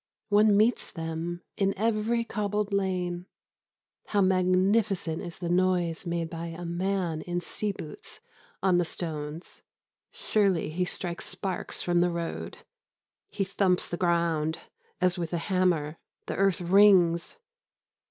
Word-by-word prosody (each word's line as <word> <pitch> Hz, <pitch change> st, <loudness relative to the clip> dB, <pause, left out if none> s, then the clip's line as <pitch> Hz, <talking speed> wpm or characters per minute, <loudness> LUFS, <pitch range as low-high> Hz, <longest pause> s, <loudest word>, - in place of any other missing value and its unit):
One 210 Hz, 0 st, +5 dB
meets 225 Hz, +3 st, +2 dB
them 165 Hz, +1 st, -4 dB
in 195 Hz, -1 st, +1 dB
every 225 Hz, +2 st, +1 dB
cobbled 210 Hz, -2 st, -2 dB
lane. 180 Hz, -2 st, -1 dB, 0.8 s
How 205 Hz, -, +1 dB
magnificent 185 Hz, -1 st, +2 dB, 0.2 s
the 175 Hz, -, -3 dB
noise 175 Hz, -1 st, +1 dB
made 170 Hz, -1 st, -1 dB
by 165 Hz, 0 st, -6 dB
a 170 Hz, +1 st, -7 dB
man 175 Hz, -2 st, -1 dB
in 175 Hz, +1 st, -2 dB
sea 205 Hz, +4 st, -2 dB
boots 155 Hz, -6 st, -8 dB, 0.4 s
on 185 Hz, -2 st, +4 dB
the -, -, +3 dB
stones! 160 Hz, -1 st, -6 dB, 0.5 s
Surely, 195 Hz, -7 st, +1 dB
he 180 Hz, +3 st, 0 dB
strikes 175 Hz, -1 st, -4 dB
sparks 185 Hz, 0 st, -3 dB
from 175 Hz, -1 st, +2 dB
the 175 Hz, -, +3 dB
road. 170 Hz, -1 st, -5 dB, 0.6 s
He 200 Hz, -, -1 dB
thumps 185 Hz, -1 st, +1 dB
the -, -, -2 dB
ground 170 Hz, -3 st, +1 dB, 0.4 s
as 180 Hz, 0 st, +2 dB
with 170 Hz, 0 st, -3 dB
a -, -, +1 dB
hammer. 170 Hz, -4 st, 0 dB, 0.3 s
The -, -, -3 dB
earth 195 Hz, -2 st, +2 dB
rings. 180 Hz, -, +5 dB
180 Hz, 130 wpm, -28 LUFS, 170-195 Hz, 0.8 s, One